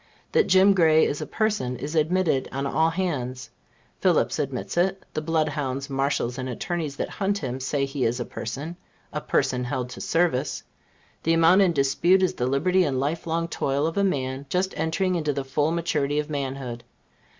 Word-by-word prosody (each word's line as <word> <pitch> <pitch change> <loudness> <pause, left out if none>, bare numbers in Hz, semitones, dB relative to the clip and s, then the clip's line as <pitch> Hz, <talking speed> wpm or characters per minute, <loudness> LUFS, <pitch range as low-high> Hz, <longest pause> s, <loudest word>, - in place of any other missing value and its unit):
That - - +3
Jim 190 +1 +6
Gray 160 -4 +5
is 145 - -2
a - - -4
person, 210 - -1
is 145 +5 -5
admitted 160 -3 +1
on 135 +1 -3
all 160 +4 +2
hands. 130 -9 -3 0.5
Phillips - - +2
admits - - -3
it; 190 +2 +1
the 155 - -2
blood 155 -1 +1
hounds, 140 -1 -3
marshals 135 -2 -1
and 130 0 -3
attorneys 155 +3 -3
that - - -2
hunt 200 0 -1
him, 130 -7 -4
say 140 +1 0
he 135 -1 -3
is 120 +2 0
a 120 - -2
person 145 +9 -6 0.4
a 150 - -2
person 130 -3 0
held 125 -1 -3
to - - -8
service. 160 -5 0 0.6
The 165 - +2
amount 165 +4 +5
in 190 -3 +4
dispute 165 +7 +3
is 185 - +2
the 125 - -1
liberty 180 +8 +2
and 135 -5 0
life 155 +5 -2
long 165 +1 0
toil 140 -2 -1
of 165 - -2
a 200 - +2
man 135 -6 -1
just 185 +3 0
entering 160 +4 0
into 155 -4 0
the 140 0 -2
full 145 +3 +1
maturity 155 -4 0
of 150 +1 -2
manhood. 135 -4 -4
150 Hz, 190 wpm, -25 LUFS, 135-170 Hz, 0.6 s, Jim